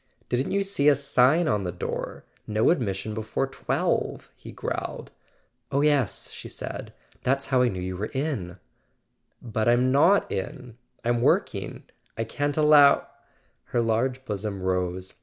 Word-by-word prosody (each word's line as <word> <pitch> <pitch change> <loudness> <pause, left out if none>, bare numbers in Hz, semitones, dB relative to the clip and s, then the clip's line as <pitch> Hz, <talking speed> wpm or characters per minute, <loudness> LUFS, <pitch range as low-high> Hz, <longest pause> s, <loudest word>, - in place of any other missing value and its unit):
"Didn't 125 +2 0
you 200 0 +1
see 170 -7 +3
a 145 - +5
sign 140 +4 +3
on 105 -8 +1
the 90 - -2
door? 90 - -5 0.2
'No 110 +5 +3
admission 110 - -2
before 110 +4 -2
twelve' 135 - -2
" - - -41
he - - -11
growled. - - -5 0.6
"Oh, 140 +1 +2
yes," 145 - +1
she - - -9
said; - - -6 0.3
"that's 135 +2 0
how 130 - +5
I 125 - +4
knew 95 -5 -3
you 95 0 -4
were 105 +3 -2
in." 130 - -3 0.9
"But 110 -2 -1
I'm 125 +2 +4
not 165 +9 +4
in; 120 +5 -5 0.3
I'm 120 0 +1
working. - - 0 0.3
I 115 - 0
can't 145 +6 -2
allow 150 -2 +6 0.3
" - - -40
Her 120 - -1
large 125 +3 0
bosom 105 -3 -4
rose. 90 0 -1
125 Hz, 160 wpm, -26 LUFS, 105-140 Hz, 0.9 s, allow